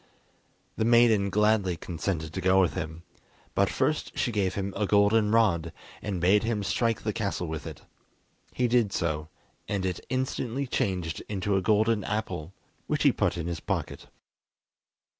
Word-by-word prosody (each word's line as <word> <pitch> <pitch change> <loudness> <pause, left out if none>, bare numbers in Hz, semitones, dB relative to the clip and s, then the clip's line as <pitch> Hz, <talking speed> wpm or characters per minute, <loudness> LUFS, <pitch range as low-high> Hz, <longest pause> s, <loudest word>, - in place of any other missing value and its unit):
The - - +1
maiden 115 -3 +4
gladly 105 -3 +2
consented 80 -2 -4
to 95 - -3
go 95 +1 +4
with 90 -3 +3
him, 80 -2 -5 0.5
but - - +2
first - - -1
she 120 - 0
gave 100 -4 0
him 100 0 -3
a 105 0 0
golden 105 +1 +4
rod, 105 -8 +2 0.3
and 100 -3 -3
bade 95 +4 +4
him 115 -3 -1
strike 115 +3 0
the 105 - -1
castle 100 -4 -2
with 80 0 -5
it. 80 -4 -9 0.7
He 125 - +1
did 120 -4 +2
so, 80 -3 -2 0.4
and 100 -2 -1
it 90 -2 -2
instantly 130 0 -2
changed 90 -9 -2
into 100 -1 -1
a 95 - +2
golden 110 +1 +2
apple, 95 -6 -3 0.4
which - - 0
he - - +6
put - - 0
in 85 - -3
his 85 -1 -3
pocket. - - -4
100 Hz, 160 wpm, -27 LUFS, 90-110 Hz, 0.7 s, he